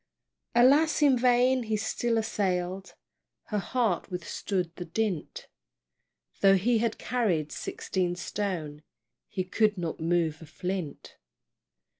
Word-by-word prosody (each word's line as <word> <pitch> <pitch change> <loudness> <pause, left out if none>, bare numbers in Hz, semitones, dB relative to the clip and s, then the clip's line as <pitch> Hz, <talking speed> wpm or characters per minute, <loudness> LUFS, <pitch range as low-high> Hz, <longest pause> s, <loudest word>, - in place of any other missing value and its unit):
Alas, 290 +6 +5
in 280 -3 +6
vain 250 +1 +3
he 220 -2 -1
still 230 +2 -1
assail'd, 190 -3 -2 0.6
He 210 - +1
heart 210 -2 0
withstood 180 -1 -3
the 175 - -6
dint; 185 -1 -3 0.9
Though 195 -1 +6
he 225 +5 +2
had 230 -1 0
carried 190 -12 0
sixteen 180 -2 -2
stone 170 -5 -4 0.5
He 185 - -3
could 210 +3 +1
not 170 -2 -3
move 165 -1 0
a 160 - -11
flint. 180 -1 -5
195 Hz, 115 wpm, -28 LUFS, 175-230 Hz, 0.9 s, in